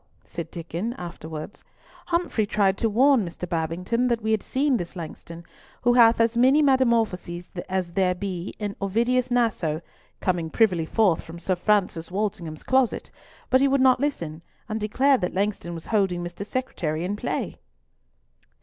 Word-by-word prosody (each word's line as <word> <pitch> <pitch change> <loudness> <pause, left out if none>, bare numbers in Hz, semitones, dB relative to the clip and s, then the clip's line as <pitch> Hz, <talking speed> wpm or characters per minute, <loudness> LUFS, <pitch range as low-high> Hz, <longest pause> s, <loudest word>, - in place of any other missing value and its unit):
said 170 -2 -6
Diccon 170 +8 -4
afterwards, 165 0 -8 0.4
"Humfrey 340 -11 0
tried 200 -2 +2
to 225 - +2
warn 255 +2 +4
Mr. 180 0 -6
Babington 175 +9 -1
that 235 -2 +1
we 220 - 0
had 220 -2 +2
seen 270 -1 +1
this 175 -1 -6
Langston, 170 0 -8 0.4
who 245 0 +4
hath 235 -2 +6
as 230 0 +3
many 265 +5 +5
metamorphoses 225 -10 +1 0.2
as 185 -2 -1
there 180 0 +1
be 185 -1 -5
in 205 -2 -4
Ovidius 235 +6 +1
Naso, 220 -11 +1 0.4
coming 175 -3 -1
privily 180 -6 +2
forth 200 -6 +2
from 165 +1 -10
Sir 185 +2 -1
Francis 180 -3 +1
Walsingham's 180 -5 -3
closet, 260 -2 +1 0.4
but 260 +1 +5
he 275 - +5
would 275 0 +2
not 260 -1 +5
listen, 170 - -3 0.3
and 215 +1 -3
declared 260 +5 +3
that 180 - -2
Langston 195 -3 -1
was 165 - -8
holding 190 -5 +1
Mr. 175 +3 -6
Secretary 175 -9 -3
in 200 +3 -2
play." - - -3
200 Hz, 160 wpm, -25 LUFS, 175-240 Hz, 0.4 s, hath